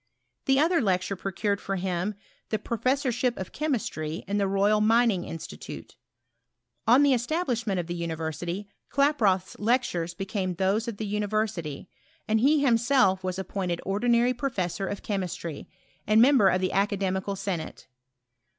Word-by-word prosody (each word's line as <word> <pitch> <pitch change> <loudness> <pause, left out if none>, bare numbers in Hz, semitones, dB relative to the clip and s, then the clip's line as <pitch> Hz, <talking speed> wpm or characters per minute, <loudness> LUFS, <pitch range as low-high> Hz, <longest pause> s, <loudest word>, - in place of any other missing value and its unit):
The 270 0 +4
other 330 +2 +3
lecture 190 -2 0
procured 200 +2 -2
for 195 - -3
him 185 +2 -2 0.3
the 215 - 0
pro* 230 +2 -4
lessorship 255 -2 +1
of 190 - -6
chemistry 195 - -2
in 205 +1 0
the 200 - +2
Royal 200 +2 +2
Mining 225 -3 +3
Institu 155 - -7
tute. - - -9 0.9
On 250 +5 +6
the 280 -2 +5
establishment 240 - -1
of 175 - -2
the 175 - -4
university, 170 +3 -4 0.2
Klaproth*s 230 -11 +2
lectures 205 -7 0
became 190 -1 -3
those 195 +6 +1
of 230 -3 -4
the 220 - -3
university, 205 -7 -2 0.4
and 220 +1 +2
he 285 +5 +4
himself 230 -6 +3
was 185 0 -2
appointed 185 -2 -3
ordinary 235 +5 +2
professor 200 -7 -2
of 205 - -5
ciiemistry, 180 -6 -4 0.4
and 215 +1 +5
member 250 -4 +6
of 185 -1 +2
the 185 - 0
academical 195 0 0
senate. 185 -5 -4
200 Hz, 145 wpm, -27 LUFS, 185-235 Hz, 0.9 s, On